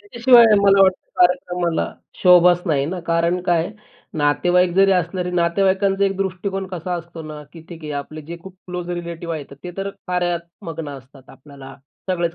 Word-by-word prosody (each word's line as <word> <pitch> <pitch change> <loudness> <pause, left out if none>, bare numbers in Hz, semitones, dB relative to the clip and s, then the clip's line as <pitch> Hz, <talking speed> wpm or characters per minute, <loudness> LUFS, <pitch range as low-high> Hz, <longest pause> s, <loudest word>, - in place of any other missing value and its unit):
त्याच्याशिवाय 235 +3 +5 0.2
मला 195 -1 +5
वाटतं 185 -1 +1
कार्यक्रमाला 180 -1 +1 0.4
शोभाच 180 -1 +6
नाही 145 -5 +1
ना, 180 +3 -4
कारण 170 +2 +1
काय 170 -2 +1
आहे? 205 - -7 0.5
नातेवाईक 175 +5 +2
जरी 195 0 +5
असले 180 0 -1
तरी 180 - -3
नातेवाईकांचा 195 +3 +1
एक 195 -1 -1
दृष्टिकोन 195 0 -3
कसा 180 -1 -4
असतो 170 -1 -8
ना, 155 -1 -8
की 165 - -11
ठीक 170 -2 -11
आहे 150 - -5
आपले 155 +2 -10
जे 165 +3 -8
खूप 190 -1 -12
क्लोज 180 -1 -5
रिलेटिव्ह 170 -1 -5
आहेत, 145 -2 -8
ते 180 - -5
तर 195 0 -3 0.2
कार्यात 175 -1 0 0.3
मग्न 165 -2 -6
असतात 135 -1 -12
आपल्याला. 135 -1 -13 0.4
सगळेच 170 -2 -1
175 Hz, 175 wpm, -20 LUFS, 165-185 Hz, 0.5 s, शोभाच